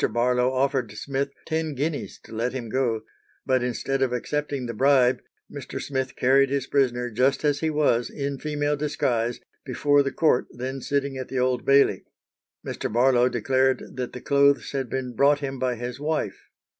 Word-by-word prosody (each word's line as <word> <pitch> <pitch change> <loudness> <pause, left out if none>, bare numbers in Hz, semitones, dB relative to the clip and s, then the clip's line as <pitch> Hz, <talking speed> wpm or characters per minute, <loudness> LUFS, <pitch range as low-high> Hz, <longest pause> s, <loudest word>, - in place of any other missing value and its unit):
Barlow 125 +2 +2
offered 130 -3 0
Smith 140 +5 -2 0.2
ten 160 -2 -2
guineas 145 +3 -3
to - - -15
let 115 +3 -1
him 120 -4 -5
go, 120 -3 0 0.4
but 130 -1 +2
instead 125 +2 -2
of 130 -2 +2
accepting 140 +1 -2
the 115 - -4
bribe, 130 +1 +3 0.3
Mr. 140 -3 -6
Smith 130 -2 -3
carried 135 +2 +4
his 140 -1 -1
prisoner 125 -4 0
just 130 +6 +1
as 145 -1 +2
he 160 - 0
was, 145 -6 +1
in 140 -2 -4
female 150 -1 -1
disguise, 125 -5 -1 0.2
before 145 +2 +2
the 140 -1 -1
court 155 -6 +2
then 130 +2 -5
sitting 140 0 -1
at 130 - -5
the 135 - -4
Old 125 -1 0
Bailey. 140 0 +4 0.6
Mr. - - -4
Barlow 125 +1 +4
declared 130 +3 0
that 125 -1 -4
the 125 - -7
clothes 140 0 +3
had 135 -3 -3
been 130 -1 -3
brought 145 +4 +4
him 135 -2 -4
by 125 -1 0
his 120 +2 -6
wife. 150 -9 -3
130 Hz, 175 wpm, -25 LUFS, 125-140 Hz, 0.6 s, carried